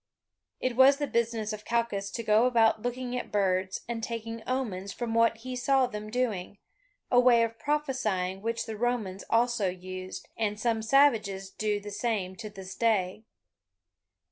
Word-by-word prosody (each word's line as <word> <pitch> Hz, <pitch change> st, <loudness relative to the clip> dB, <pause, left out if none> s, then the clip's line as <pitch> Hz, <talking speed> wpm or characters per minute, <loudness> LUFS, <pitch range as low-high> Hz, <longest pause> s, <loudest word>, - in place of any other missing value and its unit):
It 255 Hz, -2 st, -1 dB
was 265 Hz, +2 st, +7 dB
the 290 Hz, -, -1 dB
business 230 Hz, -4 st, -1 dB
of 210 Hz, 0 st, -7 dB
Calchas 230 Hz, -4 st, -1 dB
to 230 Hz, -, -3 dB
go 215 Hz, +3 st, +4 dB
about 225 Hz, -3 st, +3 dB
looking 245 Hz, +1 st, -3 dB
at 250 Hz, -, -4 dB
birds, 190 Hz, -2 st, 0 dB
and 235 Hz, -1 st, -3 dB
taking 230 Hz, 0 st, -5 dB
omens 205 Hz, -7 st, -2 dB
from 235 Hz, 0 st, -4 dB
what 230 Hz, 0 st, +3 dB
he 255 Hz, +3 st, -6 dB
saw 265 Hz, +1 st, +3 dB
them 215 Hz, -3 st, -6 dB
doing, 215 Hz, -5 st, -2 dB, 0.5 s
a 245 Hz, -, +6 dB
way 245 Hz, -2 st, +6 dB
of 230 Hz, 0 st, -3 dB
prophesying 240 Hz, -11 st, -1 dB
which 230 Hz, +1 st, -2 dB
the 220 Hz, -2 st, -5 dB
Romans 220 Hz, -5 st, -1 dB
also 230 Hz, -3 st, +2 dB
used, 185 Hz, +1 st, -7 dB
and 210 Hz, -2 st, -1 dB
some 225 Hz, -1 st, 0 dB
savages 220 Hz, -7 st, +3 dB
do 210 Hz, 0 st, -1 dB
the 205 Hz, 0 st, -8 dB
same 200 Hz, -4 st, -2 dB
to 215 Hz, -2 st, -6 dB
this 190 Hz, -2 st, -9 dB
day. 215 Hz, -2 st, 0 dB
225 Hz, 165 wpm, -29 LUFS, 200-245 Hz, 0.5 s, was